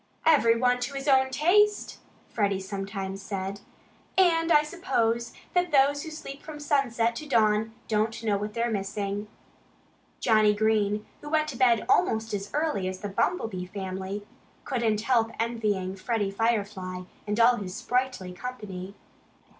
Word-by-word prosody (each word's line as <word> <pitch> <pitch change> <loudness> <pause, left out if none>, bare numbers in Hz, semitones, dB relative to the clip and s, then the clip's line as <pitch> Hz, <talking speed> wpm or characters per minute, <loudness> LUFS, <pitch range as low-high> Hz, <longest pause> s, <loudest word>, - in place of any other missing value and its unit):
"Everyone 250 -5 +4
to 245 +3 -4
his 275 +1 -4
own 265 -1 +5
taste!" 375 +10 +2 0.3
Freddie 200 -3 0
sometimes 195 0 -5
said. 195 0 -4 0.6
"And 335 -3 +4
I 300 -2 +6
suppose 235 -9 -1 0.2
that 355 -1 +1
those 285 0 +4
who 320 - -6
sleep 290 -2 -8
from 305 -2 -9
sunset 240 -6 +1
to 305 - -7
dawn 220 -3 +2
don't 220 +1 0
know 210 -2 +2
what 210 +1 -4
they're 235 0 0
missing." 200 0 -3 0.9
Johnnie 215 -2 +4
Green, 210 -1 +1 0.2
who 295 - -8
went 310 0 +1
to 280 - -6
bed 235 -3 +3
almost 220 0 +2
as 200 0 -3
early 295 -11 0
as 185 0 -5
the 205 - -4
Bumblebee 195 - -1
family, 190 +1 -5 0.4
couldn't 230 -5 0
help 230 -1 +2
envying 210 -5 -1
Freddie 205 0 -1
Firefly 200 -4 -1 0.2
and 210 +2 -1
all 240 +1 +6
his 185 -3 -6
sprightly 250 -8 -1
company. 200 -4 -7
225 Hz, 145 wpm, -27 LUFS, 200-265 Hz, 0.9 s, I